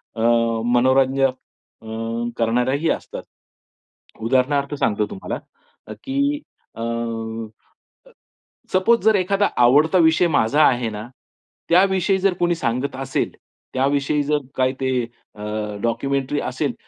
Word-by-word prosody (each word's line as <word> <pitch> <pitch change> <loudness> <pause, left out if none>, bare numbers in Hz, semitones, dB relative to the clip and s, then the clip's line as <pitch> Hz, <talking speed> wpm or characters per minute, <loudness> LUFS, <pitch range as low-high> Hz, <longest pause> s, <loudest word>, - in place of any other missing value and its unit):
अ, 110 - -4 0.5
मनोरंजन 130 +1 +3 0.5
अं, 115 +1 -4
करणाऱ्याही 125 +7 +1
असतात. - - -4 1.0
उदाहरणार्थ 140 +4 +1
सांगतो 105 -5 0
तुम्हाला, 195 - -5 0.7
की 280 +2 0 0.4
अं, 115 -1 -3 1.3
सपोज 210 +6 +3
जर 220 -1 +5
एखादा 195 +2 +1 0.2
आवडता 150 +8 +5
विषय 165 +1 +4
माझा 145 +1 +3
आहे 120 -2 +1
ना, 105 0 -6 0.7
त्याविषयी 190 +1 +3
जर 190 -1 +2
कोणी 175 0 +2
सांगत 130 -2 -2
असेल, 135 0 -2 0.4
त्याविषयी 140 +2 +1
जर 150 +1 +1 0.2
काही 130 0 +2
ते 130 0 0 0.4
अ, 105 - -11 0.4
डॉक्युमेंटरी 135 +4 -1
असेल - - -2
135 Hz, 105 wpm, -21 LUFS, 115-170 Hz, 1.3 s, जर